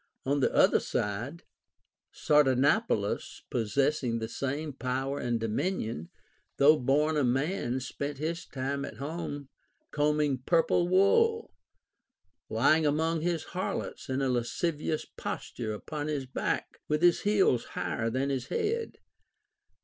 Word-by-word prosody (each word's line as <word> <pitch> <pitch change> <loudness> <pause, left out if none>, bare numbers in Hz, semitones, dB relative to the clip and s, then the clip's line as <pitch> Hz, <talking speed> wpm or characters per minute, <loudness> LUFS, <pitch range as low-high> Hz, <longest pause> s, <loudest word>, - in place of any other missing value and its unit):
On 140 +2 +1
the 135 - +2
other - - +5
side, 120 +11 -3 0.7
Sardanapalus 140 - +2
possessing 120 +2 +1
the 110 -1 -3
same 140 +5 -3
power 135 +2 -2
and 120 -1 -1
dominion, 110 - -2 0.5
though 150 +2 +6
born 150 +4 +2
a 145 - +2
man, 130 0 0
spent 140 +2 -4
his 165 +4 -3
time 140 +1 -3
at 110 - -7
home 145 0 -5 0.4
combing 150 -2 +1
purple 170 +5 +2
wool, 450 - +3 1.0
lying 145 +8 +3
among 160 +2 +1
his 170 -1 -1
har 185 +1 -1
lots - - -6
in 130 +1 0
a 135 - +1
lascivious 150 +6 -1
posture 110 -3 -5
upon 145 +8 -5
his 145 -3 -2
back, 130 - -3
with 150 +2 0
his 175 -1 +5
heels 200 - +3
higher 115 0 -1
than 130 +4 -1
his 130 -2 -2
head. 455 +1 -2
140 Hz, 125 wpm, -29 LUFS, 125-160 Hz, 1.0 s, though